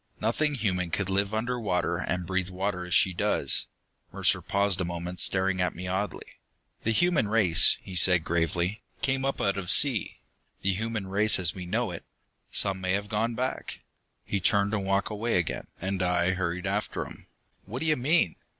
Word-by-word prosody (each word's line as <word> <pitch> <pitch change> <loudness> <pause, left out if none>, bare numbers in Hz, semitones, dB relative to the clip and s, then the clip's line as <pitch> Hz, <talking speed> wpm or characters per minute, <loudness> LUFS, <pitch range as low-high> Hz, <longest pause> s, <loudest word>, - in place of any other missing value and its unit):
"Nothing 145 +7 +1
human 90 -7 -1
can 95 +4 -1
live 100 +1 0
under 120 +3 -1
water 90 -5 0
and 90 -1 -2
breathe 95 0 -1
water, 95 0 -3
as 90 - -2
she 95 - +4
does!" - - +1 0.4
Mercer - - +2
paused 100 -2 +1
a - - +1
moment, 85 +1 -5
staring 95 -1 +2
at 90 - 0
me 90 +2 -6
oddly. 95 0 -2 0.6
"The - - 0
human 160 0 +2
race," 100 -7 +4
he 95 - -9
said 90 -1 +5
gravely, 85 +4 -1 0.2
"came 135 0 +1
up 135 0 -1
out 100 0 +1
of 90 -2 -6
sea. 135 -7 +3 0.5
The 100 0 +2
human 110 +1 -3
race 105 +3 +3
as 85 -3 +3
we 90 -2 -7
know - - -1
it. - - -7 0.5
Some 95 -1 0
may 95 0 0
have 100 +1 -2
gone 115 +2 0
back." 130 +2 -3 0.4
He 100 - -1
turned 100 +2 +2
and 100 -3 -1
walked 100 +2 +1
away 110 0 0
again, 85 - -2
and 95 +1 -2
I 90 0 +2
hurried 90 0 -2
after 100 +2 -2
him. - - -13 0.4
"What 120 +7 -6
do - - -2
you 155 -1 +3
mean. 135 - +2
95 Hz, 185 wpm, -28 LUFS, 90-110 Hz, 0.6 s, said